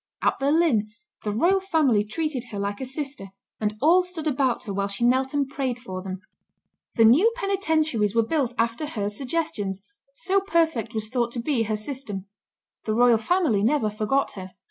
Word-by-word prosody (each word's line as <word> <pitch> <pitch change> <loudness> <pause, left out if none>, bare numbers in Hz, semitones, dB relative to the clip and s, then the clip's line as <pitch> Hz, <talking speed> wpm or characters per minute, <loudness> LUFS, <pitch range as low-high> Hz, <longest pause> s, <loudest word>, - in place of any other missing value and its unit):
At - - +2
Berlin, 280 -7 +2 0.3
the 210 - -2
royal 345 - +3
family 310 - +2
treated 265 +3 -3
her 220 -4 -8
like 200 +2 -3
a 260 - -3
sister, 275 -6 -5 0.3
and 210 0 -2
all 340 +6 +6
stood 360 -3 -6
about 270 -4 +1
her 205 -5 -5
while 200 0 -1
she 200 +4 -2
knelt 260 +2 +2
and 285 -2 +1
prayed 265 -3 -2
for 190 -7 -7
them. 190 0 -6 0.7
The 225 - +5
new 315 - +6
penitentiaries 315 - 0
were 230 - +4
built 260 -3 -1
after 230 +6 0
her 205 -8 -3
suggestions, 210 - -3 0.3
so 395 -6 +1
perfect 320 - 0
was 215 -1 -2
thought 240 -1 0
to 240 - -3
be 245 0 0
her 215 0 -1
system. 215 -5 -5 0.6
The 215 - 0
royal 240 -1 +5
family 305 - +1
never 230 -3 +2
forget 215 +6 0
her. 190 -1 -9
245 Hz, 180 wpm, -25 LUFS, 215-310 Hz, 0.7 s, all